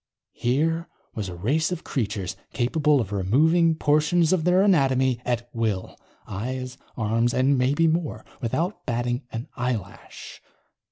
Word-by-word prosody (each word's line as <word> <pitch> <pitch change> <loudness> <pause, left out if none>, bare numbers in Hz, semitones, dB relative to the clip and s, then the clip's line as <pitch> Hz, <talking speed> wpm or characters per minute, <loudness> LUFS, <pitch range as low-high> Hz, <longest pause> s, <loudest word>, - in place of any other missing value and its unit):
Here 160 +7 0 0.3
was 105 -4 -4
a 90 - -7
race 140 - 0
of 180 - -4
creatures 100 -7 -3 0.2
capable 145 +5 +2
of 105 -5 -3
removing 160 - +3
portions 155 +3 +3
of 170 -4 +1
their 180 +2 +4
anatomy 130 - +3
at 120 -1 -1
will. 110 -5 -2 0.3
Eyes, 125 +5 -4 0.2
arms 115 +1 +1
and 130 +2 +3
maybe 135 +5 +2
more. 160 -1 -1 0.2
Without 165 - -2
batting 120 +1 -1
an 115 +2 -5
eyelash. 120 -6 -5
130 Hz, 130 wpm, -25 LUFS, 115-160 Hz, 0.3 s, their